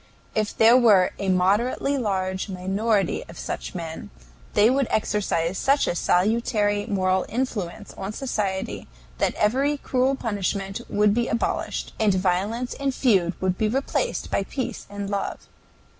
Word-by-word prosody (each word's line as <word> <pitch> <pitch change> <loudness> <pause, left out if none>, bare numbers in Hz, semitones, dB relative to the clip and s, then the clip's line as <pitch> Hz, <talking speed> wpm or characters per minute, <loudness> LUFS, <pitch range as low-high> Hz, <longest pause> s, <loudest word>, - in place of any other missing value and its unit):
If 215 -1 -1
there 225 +2 +7
were 215 -7 +5
a 195 - -1
moderately 205 +9 +2
large 190 -5 -1
minority 195 +2 0
of 170 - -11
such - - -5
men, 165 -2 -6 0.5
they 210 +1 +6
would 265 +1 +2
exercise 195 -5 0
such 275 +1 +3
a - - 0
salutary 205 +3 +1
moral 185 -1 +1
influence 215 -5 -3
on 195 +1 -5
society 210 -6 -3 0.3
that - - +1
every 270 +7 +1
cruel 260 0 +1
punishment 200 -4 -2
would 210 0 +3
be 240 +2 +1
abolished, 230 - -2
and 210 -3 +3
violence 195 +7 0
and 275 -2 -2
feud 190 -9 +2
would 185 -1 -1
be 220 - +2
replaced 275 - -1
by - - +1
peace 255 +7 -5
and 205 0 -5
love. 200 -1 -3
205 Hz, 145 wpm, -24 LUFS, 190-235 Hz, 0.5 s, there